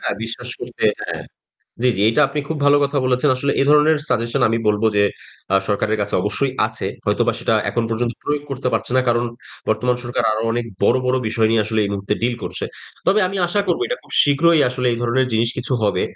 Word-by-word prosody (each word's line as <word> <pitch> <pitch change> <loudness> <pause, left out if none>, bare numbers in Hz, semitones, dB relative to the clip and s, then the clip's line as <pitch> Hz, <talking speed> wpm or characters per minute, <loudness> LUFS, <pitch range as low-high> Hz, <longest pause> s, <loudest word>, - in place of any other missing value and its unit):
হ্যাঁ, - - -2
বিশ্বাস 120 +2 -6
করতে 120 -2 -5 0.2
হ্যাঁ। - - -4 0.6
জ্বি, 125 - +4
জি, 100 - 0
এটা 150 - +1
আপনি 150 +1 -2
খুব 160 - -3
ভালো 145 0 +6
কথা 140 0 -1
বলেছেন। 125 +3 +2
আসলে 140 +2 0
এ - - +2
ধরনের 150 +1 +5
সাজেশন 115 -1 0
আমি 115 - 0
বলব 105 +1 +1
যে 100 - +4 0.5
আ - - +7
সরকারের 105 +1 0
কাছে 100 - -4
অবশ্যই 130 +6 -1
আছে। - - -6 0.2
হয়তোবা - - +2
সেটা - - +1 0.2
এখন 120 -1 -1
পর্যন্ত 115 +1 -1
প্রয়োগ 145 0 -1
করতে 130 -1 -2
পারছে - - -1
না। - - +5
কারণ 120 0 +2 0.4
বর্তমান 125 +3 +1
সরকার 120 0 -1
আরো 110 +1 -2
অনেক 120 0 -1 0.2
বড়, 125 - +4
বড় 130 - +2
বিষয় 110 0 +1
নিয়ে 115 -1 +3
আসলে 110 0 -1
এই 100 - -2
মুহূর্তে 100 +1 -2
ডিল 120 +1 +1
করছে। - - -5 0.4
তবে 205 +3 +4
আমি 195 +2 -4
আশা 205 +4 0
করব - - +1
এটা - - -2
খুব - - -18
শীঘ্রই 160 +3 +4
আসলে 125 0 -2
এই 115 - -2
ধরনের 130 +2 +1
জিনিস 115 +1 +2
কিছু 125 - -3
হবে। 105 - +1
120 Hz, 220 wpm, -20 LUFS, 115-140 Hz, 0.6 s, আ